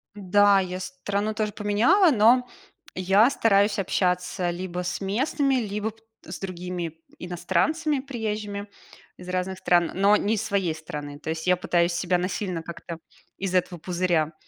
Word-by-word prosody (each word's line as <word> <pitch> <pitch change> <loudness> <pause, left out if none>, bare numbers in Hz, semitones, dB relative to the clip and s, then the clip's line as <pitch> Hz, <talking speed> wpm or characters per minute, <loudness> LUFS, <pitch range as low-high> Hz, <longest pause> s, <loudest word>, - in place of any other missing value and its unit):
Да, 205 0 +4
я 185 -1 -3
страну 200 +3 -3
тоже 215 -1 -1
поменяла, 225 - +3
но 245 +2 +4 0.5
я 195 +6 +4
стараюсь 205 -5 +3
общаться 180 -1 0
либо 180 0 -4
с 175 +2 -3
местными, 270 +8 0
либо 210 -2 -2 0.3
с - - -7
другими 180 -3 -5 0.2
иностранцами, 190 - 0
приезжими 215 -6 -4 0.5
из 180 0 -10
разных 185 +1 -2
стран, 175 -2 +2
но 200 +2 +4
не 210 +1 0
из 210 - -2
своей 195 -5 0
страны. 145 -2 -7
То 160 - -7
есть 160 +2 -3
я 180 - +5
пытаюсь 175 -1 +1
себя 180 +1 +1
насильно 180 -1 -3
как-то 170 0 -8 0.4
из 190 -1 -3
этого 180 -1 0
пузыря 170 -2 0
190 Hz, 145 wpm, -25 LUFS, 175-210 Hz, 0.5 s, я